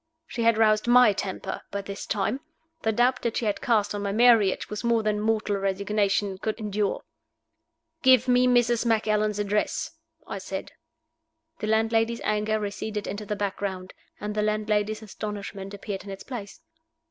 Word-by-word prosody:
She 245 - -5
had 230 -1 +4
roused 215 0 +3
my 245 -3 +7
temper 190 -1 -4
by 200 0 -4
this 200 0 -7
time. 210 +5 0 0.4
The 220 - +1
doubt 245 +3 +2
that 235 -1 -1
she 235 - -1
had 210 - -1
cast 225 -6 +2
on 205 - -3
my 200 -1 -1
marriage 225 -3 +4
was 210 +2 -5
more 235 -1 +2
than 210 -1 0
mortal 215 -2 +1
resignation 200 0 0
could 220 +3 -3
endure. 210 -1 -1 1.0
"Give 260 -1 +5
me 250 0 +4
Mrs. 240 -2 +3
Macallan's 215 -2 +1
address," 205 0 -1 0.3
I - - -5
said. - - -6 0.9
The 215 - -3
landlady's 225 +1 +1
anger 215 +1 0
receded 210 0 -4
into 205 +1 -5
the 210 - -1
background, 195 -2 -3 0.3
and 210 0 -4
the 210 - 0
landlady's 215 0 0
astonishment 200 -2 -6
appeared 200 -1 -6
in 200 - -10
its 195 0 -7
place. 240 +3 -8
215 Hz, 160 wpm, -26 LUFS, 200-225 Hz, 1.0 s, my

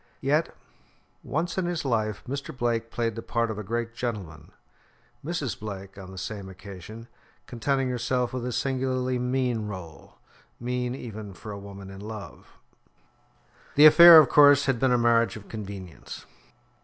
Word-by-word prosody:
Yet 150 +4 0 0.7
once 170 +6 -2
in 185 - -1
his 175 -4 -3
life 110 -5 -1
Mr. 140 0 -5
Blake 115 -2 -1
played 115 -2 -2
the 115 - -5
part 115 0 -1
of 105 - -6
a - - -5
great 115 +3 -3
gentleman; 100 - -6 0.7
Mrs. 155 -5 -3
Blake, 100 -2 -7
on 95 -2 -10
the 95 - -11
same 100 0 -6
occasion, 100 +4 -11 0.4
contenting 135 +2 -1
herself 125 0 -1
with 130 -2 -3
a - - -3
singularly 130 -1 -1
mean 125 -3 -1
role 90 -6 -10 0.4
mean 125 +1 -2
even 110 -6 -8
for 105 +3 -9
a 100 - -7
woman 100 -1 -10
in 95 0 -10
love. 105 -3 -9 1.3
The 150 - +8
affair, 170 +2 +11
of 155 -3 +8
course, 145 +1 +6
had 135 -4 0
been 130 0 +2
a 125 - +4
marriage 115 -3 +2
of 105 -2 -11
convenience. 100 -5 -8
115 Hz, 155 wpm, -26 LUFS, 105-130 Hz, 1.3 s, affair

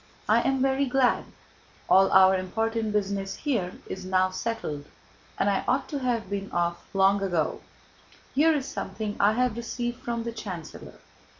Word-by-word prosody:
I - - +4
am 270 -1 +1
very 270 +1 +2
glad. 255 0 +2 0.6
All 195 0 +5
our 190 0 +7
important 220 +4 -1
business 195 -1 -1
here 225 -12 -1
is 190 - -6
now 185 0 +2
settled, 185 -8 -4 0.5
and - - +1
I 200 -1 +1
ought 270 - +1
to 285 - -3
have 240 -5 -1
been 200 0 -4
off 175 0 -1
long 195 +1 +4
ago. 175 -5 -1 0.7
Here 310 +4 +4
is 290 -4 -1
something 210 -1 -4
I 205 +2 +4
have 250 -1 +1
received 240 +1 -4
from 235 -1 -3
the 235 - -3
chancellor. 190 -8 -8
210 Hz, 160 wpm, -27 LUFS, 190-245 Hz, 0.7 s, our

